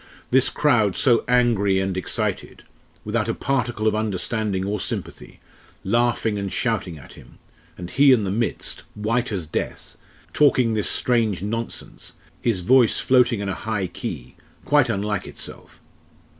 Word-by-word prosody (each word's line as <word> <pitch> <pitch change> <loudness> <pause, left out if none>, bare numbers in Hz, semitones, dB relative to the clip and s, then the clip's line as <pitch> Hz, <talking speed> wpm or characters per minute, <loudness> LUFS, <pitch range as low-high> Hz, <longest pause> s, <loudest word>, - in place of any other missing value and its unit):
"This 130 +1 +4
crowd 110 -10 +2
so 120 -4 +3
angry 115 -6 +3
and 95 -1 -1
excited 95 - -3 0.4
without - - -1
a - - -1
particle 120 -5 -1
of - - +3
understanding 105 -1 -1
or 105 +1 -2
sympathy - - -6 0.4
laughing, 115 0 +1
and 100 -1 -4
shouting 100 -9 -1
at 65 - -14
him - - -16 0.4
and 90 - -6
he 140 +8 +5
in 120 -5 +4
the 95 - -2
midst 115 +3 -3
white 115 +3 -1
as 95 -5 -3
death 80 - -5 0.4
talking 130 -6 +3
this 105 -2 0
strange 110 -7 +1
nonsense 115 +3 -6 0.3
his 110 -6 0
voice 120 +5 +4
floating 125 -4 +3
in 100 - -3
a 95 - -1
high 110 -2 -2
key, 65 -7 -7 0.3
quite 145 -4 +3
unlike 105 -3 -2
itself. - - -11
110 Hz, 145 wpm, -23 LUFS, 100-120 Hz, 0.4 s, he